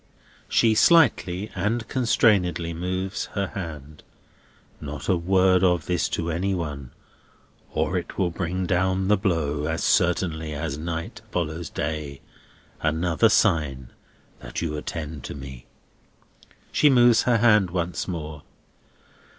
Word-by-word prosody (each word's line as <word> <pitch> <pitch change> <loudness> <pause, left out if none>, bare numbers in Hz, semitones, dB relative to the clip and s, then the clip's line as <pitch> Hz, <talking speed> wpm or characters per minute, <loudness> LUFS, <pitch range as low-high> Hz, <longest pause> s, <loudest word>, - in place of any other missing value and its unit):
She 115 -1 +4
slightly 105 - +3
and 110 +5 -1
constrainedly 95 - +2
moves 95 +3 -3
her 100 -2 0
hand. 75 -5 -7 0.8
"Not 75 +1 -7
a 95 - +3
word 95 +1 +3
of 90 -4 +2
this 90 -2 0
to 85 0 -2
any 95 +4 -1
one, 75 -7 -5 0.8
or 95 - -1
it 85 - -10
will 90 -3 +1
bring 90 +2 -3
down 95 +1 0
the 105 - +6
blow, 80 -7 -1
as 80 +1 -2
certainly 80 -3 +1
as 75 -1 -3
night 85 +2 -5
follows 85 -1 -3
day. 75 -2 -4 0.6
Another 80 +6 +2
sign 75 - +1 0.5
that - - -6
you 80 -3 -3
attend 75 -1 -6
to - - -6
me." 65 -3 -10 1.0
She 150 - +4
moves 120 -3 +5
her 120 -2 +3
hand 105 -4 +4
once 90 0 -3
more. 80 -5 -5
85 Hz, 125 wpm, -24 LUFS, 80-95 Hz, 1.0 s, the